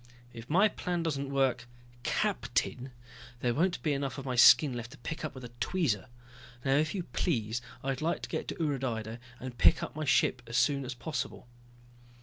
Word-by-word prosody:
"If 115 +1 -10
my 190 +7 +5
plan 175 -4 -2
doesn't 140 -4 -2
work, 135 -3 +1 0.3
captain 130 +1 -1 0.5
there 120 -1 +1
won't 175 +7 +1
be 150 - +2
enough 140 0 -2
of 135 - -6
my 130 -2 -2
skin 130 +3 +8
left 120 -1 -5
to - - -13
pick 155 +6 -6
up 155 -3 -4
with 130 - -9
a 120 - -8
tweezer. 145 - 0 0.6
Now 135 - +3
if 155 +5 +1
you 185 - -2
please, 120 - -1 0.2
I'd 135 0 -2
like 165 +2 -1
to - - -5
get - - -3
to - - -4
Udrydde 125 -7 -2 0.2
and 125 -2 -7
pick - - +5
up - - -6
my 155 0 -3
ship 130 -2 +3
as 120 +2 -2
soon 140 -2 +2
as 125 0 -5
possible." 135 -2 -4
135 Hz, 190 wpm, -31 LUFS, 125-155 Hz, 0.6 s, skin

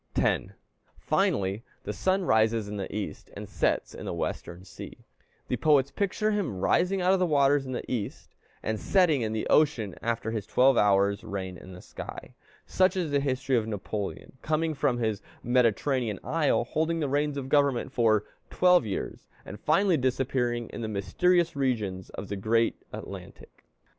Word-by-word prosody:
10. - - 0 0.4
Finally, 95 +2 0 0.2
the 105 - -4
sun 190 - +1
rises 110 -3 +2
in 105 - -5
the 100 -2 -5
East 105 - -5
and - - -7
sets - - 0
in - - -8
the - - -2
Western 90 +2 -4
sea. - - -10 0.5
The - - -1
poets 140 -3 +3
picture 210 +2 0
him 200 - -1
rising 180 - +2
out 185 +1 +4
of 190 - +2
the 180 - +2
waters 140 -2 +3
in - - -5
the - - -3
East, 115 -6 -4 0.3
and 110 -1 -2
setting 175 -8 +3
in 110 -1 -1
the 110 0 -2
ocean 125 - +2
after 115 0 -2
his 110 -3 -4
twelve 130 +1 +4
hours' 100 -1 +3
reign 95 -4 -5
in 95 +2 -11
the 90 - -11
sky. - - -9 0.3
Such 190 0 +2
is 170 -5 -1
the 140 - +3
history 130 -1 0
of 110 -2 +1
Napoleon, 105 +4 -5
coming 155 +1 0
from 140 -4 0
his 110 -4 -1 0.2
Mediterranean 120 -1 +1
isle, 155 -6 +1
holding 160 +6 -1
the 150 - 0
reins 145 +1 0
of 135 -2 -4
government 140 -3 +2
for 110 -5 +3 0.3
twelve 180 -9 +4
years, 100 - -5 0.2
and 100 - -8
finally 175 +3 +3
disappearing 125 -2 0
in - - -7
the 110 - -2
mysterious 170 - +1
regions 110 -9 -1
of 100 - -7
the 100 - -4
great 115 +4 +2 0.2
Atlantic. - - -10
125 Hz, 175 wpm, -28 LUFS, 105-150 Hz, 0.5 s, out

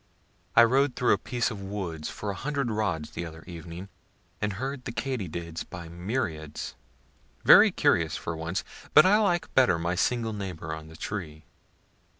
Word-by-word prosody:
I 120 - +9
rode 130 +3 +3
through 125 - +3
a - - +1
piece 120 -1 -1
of 105 -3 -6
woods 95 -6 -4
for 105 - -4
a - - -6
hundred 140 -1 -2
rods 95 -8 -1
the - - -4
other 80 -1 -9
evening, 85 +1 -8 0.5
and 105 -1 0
heard 130 +5 -4
the - - -3
katydids 95 - -4
by 85 -3 -9
myriads 85 - -3 0.7
very - - +9
curious 80 -3 +2
for 85 - -4
once; 80 +3 -3 0.3
but - - +9
I 205 +3 +6
like 180 -5 +1
better 125 -10 +5
my 85 +1 -1
single 115 +4 0
neighbor 90 -6 -5
on 80 0 -7
the 80 - -12
tree. 80 -7 -5
95 Hz, 165 wpm, -28 LUFS, 85-120 Hz, 0.7 s, I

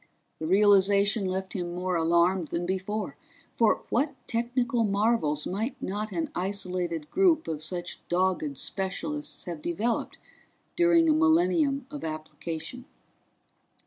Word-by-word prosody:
The 160 - -3
realization 200 +2 +4
left 190 0 -3
him 175 -2 -3
more 180 0 -1
alarmed 170 +1 +2
than 170 +3 -2
before 190 +3 -3 0.4
for 225 -2 +3
what 280 +3 +1
technical 240 +1 0
marvels 200 -8 +1
might 220 +8 -3
not 210 +2 -3
an 320 +3 -2
isolated 180 -4 -3
group 350 -4 +3
of 155 -2 -3
such 175 +2 -4
dogged 175 -6 0
specialists 295 - -4
have 170 -4 -5
developed 215 +9 -1 0.6
during 340 -1 +4
a 310 - +5
millennium 320 -3 +3
of 295 - -7
application? 160 +7 -6
195 Hz, 120 wpm, -28 LUFS, 175-245 Hz, 0.6 s, a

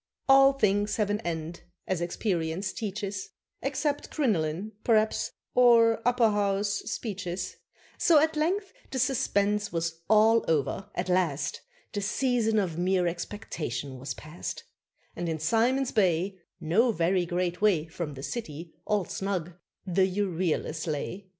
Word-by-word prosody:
All 270 0 +7
things 205 -4 +1
have 210 -2 0
an 205 - 0
end, 165 -1 -4 0.2
as 185 -2 -1
experience 175 0 -1
teaches 200 -3 -4 0.3
(Except 285 +2 -1
crinoline, 195 - 0
p'raps, 220 -2 +2 0.2
or 230 -2 +5
Upper 245 -3 +4
House 200 0 +1 0.2
speeches); 185 -4 -4 0.4
So 330 - +5
at 315 +2 +3
length 375 +6 0 0.2
the 265 - -4
suspense 210 -5 +1
was 165 -1 -2
all 220 +1 +5
over 160 +5 0
at 180 - -2
last 180 -6 0 0.3
The 205 - -2
season 225 +1 +1
of 175 -5 0
mere 185 0 +2
expectation 155 - -4
was 130 -1 -5
past, 155 +3 -7 0.5
And 175 -1 -3
in 160 - -1
Simon's 235 - +1
Bay, 190 -1 +1 0.2
No 215 +10 +3
very 175 -1 +1
great 180 +1 -1
way 190 -8 +3
From 160 -2 -6
the 135 - -8
city, 165 -7 -6
all 210 -3 +1
snug, 185 -3 -3 0.3
the 185 0 +2
Euryalus 180 -4 -1
lay. 170 +6 -4
195 Hz, 135 wpm, -28 LUFS, 170-225 Hz, 0.5 s, All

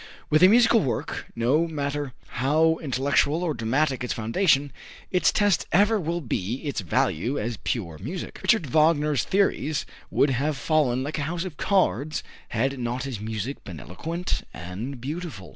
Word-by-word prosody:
With 155 +1 +5
a 185 - +9
musical 230 +2 +6
work, 125 - -3
no 135 +9 +2
matter 145 -3 -3 0.2
how 155 +6 +2
intellectual 140 +3 +1
or 165 -3 0
dramatic 130 +3 0
its 125 - -1
foundation, 140 - +2 0.4
its 180 - +3
test 205 -3 +2
ever 205 +4 +4
will 170 0 -2
be 115 - -2
its 140 -7 -2
value 95 - 0
as 115 +1 -2
pure 85 -11 -3
music. 160 - -6
Richard 220 -8 +3
Wagner's 150 0 +3
theories 170 -6 +1 0.2
would 140 - +3
have 140 +3 0
fallen 130 -1 +1
like 150 +3 -3
a 145 +1 -2
house 175 +1 -3
of 165 -6 -7
cards, 155 -6 +1 0.2
had 135 +4 -1
not 120 +1 -2
his 130 -6 -4
music 110 +5 -4
been 85 -6 -8
eloquent 165 - -4
and 100 +10 -6
beautiful. 145 - -6
145 Hz, 160 wpm, -25 LUFS, 120-165 Hz, 0.4 s, a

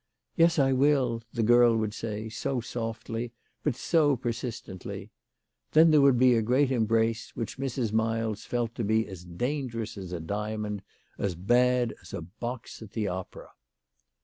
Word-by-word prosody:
" - - -57
Yes; 165 0 +4
I 135 -2 +4
will," 130 -4 +2
the 115 - -1
girl 120 0 +6
would 110 -1 -1
say, 110 0 -4
so 125 +4 -2
softly, 115 0 -4 0.3
but 145 -6 0
so 145 0 +3
per 120 -1 -2
sistently! 115 -6 -6 0.6
Then 160 +1 +7
there 150 -2 +6
would 140 -3 +5
be 125 0 +6
a 115 - +3
great 130 +5 +2
embrace, 115 -1 +1
which 115 +3 -5
Mrs. 125 -5 -2
Miles 110 -1 0
felt 120 -2 -2
to 120 - -3
be 110 +2 +2
as 95 -3 -9
dangerous 115 - -3
as 95 -2 -7
a 90 - -3
diamond, 105 +3 -3 0.4
as 95 -3 -1
bad 120 +5 +2
as - - -8
a - - -5
box 115 +9 -7
at 110 -3 -11
the 110 -3 -1
opera. 95 0 -6
115 Hz, 170 wpm, -28 LUFS, 110-125 Hz, 0.6 s, Then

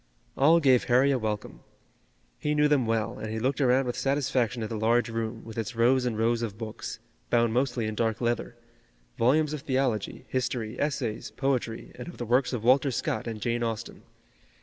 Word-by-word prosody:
All 160 +5 +5
gave 130 -5 +4
Harry 130 +3 +4
a 130 - +1
welcome. 105 -2 -4 0.8
He 150 0 0
knew 150 0 +4
them 140 -5 +2
well, 115 -1 -1
and 110 - -5
he 110 - -3
looked 130 +5 0
around 130 0 +3
with 125 - -2
satisfaction 130 -3 0
at 110 - -4
the 115 - -4
large 115 +3 +2
room, 115 0 -4
with 115 0 -6
its 120 +2 -4
rows 125 +2 +3
and 115 -3 -2
rows 115 +1 +1
of 110 -3 -4
books, 110 -1 -6 0.3
bound 115 -1 +3
mostly 120 -2 0
in 110 - -2
dark 110 0 0
leather, 120 0 -2 0.6
volumes 150 +5 +3
of 150 - -4
theology, 130 -7 -1
history, 120 -3 -2
essays, 120 -6 -2
poetry, 130 -4 -2
and - - -9
of 175 - -9
the 120 - -4
works 125 +2 +2
of 120 -4 -3
Walter 130 +3 +4
Scott 120 - -2
and 110 -2 -4
Jane 120 +2 -1
Austen. 115 -2 -4
120 Hz, 195 wpm, -27 LUFS, 115-135 Hz, 0.8 s, All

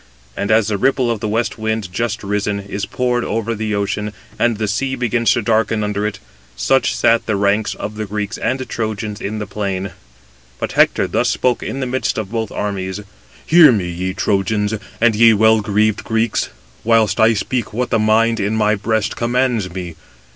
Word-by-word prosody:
And 100 - -3
as 110 -1 +3
the 100 -2 -1
ripple 130 0 +2
of 115 - -2
the 110 - -3
west 115 +1 -1
wind, 110 -4 -2
just 115 +1 -2
risen, 105 0 -1
is 100 0 -5
poured 125 +1 0
over 115 0 -2
the 110 -1 -2
ocean, 105 +1 -2 0.3
and 120 -2 +2
the 110 0 -1
sea 130 +6 -1
begins 120 -2 0
to 120 - -1
darken 110 0 +1
under 105 0 -1
it, 100 -2 -5 0.4
such - - +2
sat 115 0 +2
the 110 - +1
ranks 100 +2 +1
of 105 - -5
the 110 -1 -3
Greeks 105 +1 -4
and 130 +1 -2
Trojans 110 -2 -4
in 105 +2 -3
the 105 - -3
plain: 100 -2 -3 0.7
but - - -3
Hector - - +3
thus - - +1
spoke 125 -2 +1
in 135 - -4
the - - -1
midst 130 +1 -1
of 105 -2 -4
both 110 -2 -2
armies: 100 -1 -3 0.4
"Hear 160 -3 +7
me, 95 -6 -1
ye 90 +2 -3
Trojans, 105 +2 0 0.3
and 115 -1 +3
ye 115 0 +6
well 110 +1 +4
greaved 105 +1 +1
Greeks, 110 -1 0 0.3
whilst 110 -3 +2
I 110 +1 +5
speak 120 +3 -2
what 120 +3 -2
the 115 - +3
mind 115 +1 +3
in 100 +2 0
my 105 -1 +2
breast 110 0 -1
commands 120 -4 0
me. 90 -2 -6
110 Hz, 190 wpm, -18 LUFS, 100-115 Hz, 0.7 s, Hear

